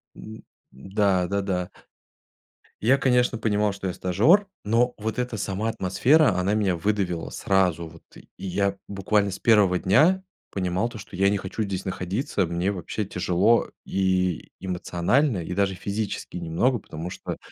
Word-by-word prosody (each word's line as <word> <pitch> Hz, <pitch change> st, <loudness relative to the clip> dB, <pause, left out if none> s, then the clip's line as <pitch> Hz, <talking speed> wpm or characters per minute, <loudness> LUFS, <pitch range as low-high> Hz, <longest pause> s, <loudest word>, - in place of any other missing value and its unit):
М 110 Hz, -, -10 dB
м. -, -, -12 dB, 0.3 s
Да, 95 Hz, +5 st, 0 dB
да, 100 Hz, +2 st, -1 dB
да. 90 Hz, -2 st, -2 dB, 1.2 s
Я, 130 Hz, +4 st, +5 dB
конечно, 125 Hz, -3 st, +2 dB
понимал, 105 Hz, -2 st, +1 dB
что 100 Hz, 0 st, -8 dB
я- 90 Hz, -, -1 dB
стажер, 130 Hz, -, +3 dB, 0.2 s
но 120 Hz, +4 st, +2 dB
вот 110 Hz, +2 st, -3 dB
эта 125 Hz, -3 st, -2 dB
сама 100 Hz, +2 st, -2 dB
атмосфера, 120 Hz, -, +3 dB
она 100 Hz, +3 st, +1 dB
меня 100 Hz, -4 st, +1 dB
выдавила, 90 Hz, -1 st, -1 dB
сразу 90 Hz, -4 st, +1 dB
вот. 80 Hz, +1 st, -15 dB, 0.2 s
И -, -, -16 dB, 0.2 s
я 100 Hz, +1 st, 0 dB
буквально 100 Hz, +1 st, +1 dB
с 95 Hz, -, -5 dB
1 105 Hz, -5 st, +4 dB
дня 160 Hz, -, +3 dB, 0.3 s
понимал 95 Hz, +4 st, -1 dB
то, 115 Hz, -, -9 dB
что 100 Hz, -2 st, -10 dB
я 100 Hz, +1 st, +3 dB
не 100 Hz, -, +1 dB
хочу 95 Hz, +3 st, -5 dB
здесь 95 Hz, -3 st, -3 dB
находиться. 95 Hz, -, -2 dB
Мне 85 Hz, +4 st, -1 dB
вообще 95 Hz, +3 st, -4 dB
тяжело 95 Hz, +5 st, +2 dB, 0.2 s
и 95 Hz, -3 st, 0 dB
эмоционально, 95 Hz, -, 0 dB
и 90 Hz, -, -5 dB
даже 95 Hz, 0 st, 0 dB
физически 100 Hz, 0 st, -4 dB
немного, 85 Hz, +10 st, 0 dB
потому 85 Hz, 0 st, -7 dB
что -, -, -6 dB
100 Hz, 160 wpm, -25 LUFS, 90-110 Hz, 1.2 s, Я